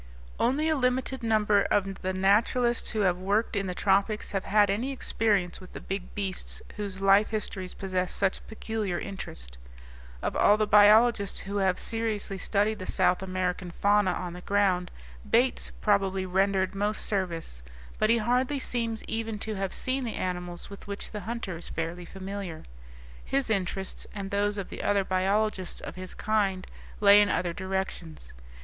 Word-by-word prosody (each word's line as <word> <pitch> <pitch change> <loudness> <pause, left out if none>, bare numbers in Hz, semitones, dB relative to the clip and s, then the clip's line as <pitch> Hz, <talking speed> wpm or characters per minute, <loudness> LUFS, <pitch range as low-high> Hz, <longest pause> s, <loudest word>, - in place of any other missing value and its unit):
Only 275 +6 +2
a 315 - +2
limited 260 -1 0
number 215 -3 +3
of 195 -1 0
the 185 - -1
naturalists 220 +6 +2
who 220 - -1
have 180 -2 +2
worked 205 +5 0
in 195 -1 -1
the 180 - -3
tropics 200 +3 +1
have 195 -2 -2
had 205 0 +4
any 235 +7 -1
experience 205 -9 0
with 185 - -13
the - - -6
big 195 -1 -5
beasts 195 -3 -3 0.2
whose 200 -2 -5
life 195 +2 +5
histories 195 -4 -4
possess 185 -2 -2
such 195 -1 -1
peculiar 220 -4 -3
interest. 60 - -7 0.6
Of - - -1
all 205 - +5
the 215 - +2
biologists 210 0 +5
who 200 +1 -4
have 190 -2 +2
seriously 220 -4 -2
studied 210 +3 +1
the 185 - -6
South 180 - +2
American 185 -1 -2
fauna 200 +2 +2
on 175 -1 -4
the 180 - -8
ground, 190 -3 +1 0.4
Bates 245 +2 +2
probably 195 -2 +1
rendered 190 0 +1
most 205 +2 -1
service; 170 - -2 0.4
but 215 - +3
he 235 - +5
hardly 250 +5 +1
seems 230 -4 -2
even 225 -1 -3
to 215 +1 -4
have 195 -2 -2
seen 260 +1 -1
the 230 - -3
animals 180 -1 -4
with 200 0 -11
which 200 0 -6
the 210 - -4
hunter 230 -7 -4
is 170 - -5
fairly 165 +2 -4
familiar. 195 -3 -6 0.6
His 270 -4 0
interests, 190 -1 -2
and 195 -1 -5
those 205 +1 +1
of 195 - -4
the - - -6
other 200 -1 +2
biologists 190 +1 0
of - - -7
his 185 0 -6
kind, 200 -3 0 0.3
lay 205 0 +8
in 205 - +3
other 175 -2 0
directions. 190 - -4
200 Hz, 170 wpm, -28 LUFS, 185-215 Hz, 0.6 s, lay